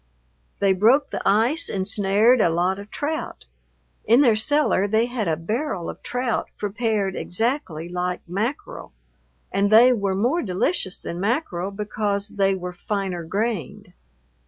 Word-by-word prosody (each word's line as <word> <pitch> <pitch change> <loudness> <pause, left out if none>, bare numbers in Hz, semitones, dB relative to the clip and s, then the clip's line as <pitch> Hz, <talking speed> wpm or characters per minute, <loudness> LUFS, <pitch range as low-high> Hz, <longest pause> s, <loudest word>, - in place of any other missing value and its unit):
They 195 -1 +3
broke 230 +10 +3
the - - -3
ice 235 +11 +2
and 190 -1 -2
snared 210 +4 +3
a 170 - +4
lot 180 +4 0
of 200 +1 -10
trout. 305 - -4 0.6
In 235 +5 +5
their 240 -6 +5
cellar 225 -4 +2
they 220 +3 +2
had 240 -5 -3
a 160 -1 0
barrel 210 - -3
of - - -16
trout 250 -2 -2
prepared 205 -2 -1
exactly 205 - -2
like 180 0 -3
mackerel, 215 +10 -4 0.6
and 200 +1 +1
they 240 +4 +7
were 200 -4 -1
more 250 - +1
delicious 185 - -1
than 170 - -6
mackerel 200 - -1
because 205 0 -2
they 195 -1 +1
were 180 -1 -6
finer 190 -2 -3
grained. 200 - -3
205 Hz, 145 wpm, -23 LUFS, 185-235 Hz, 0.6 s, they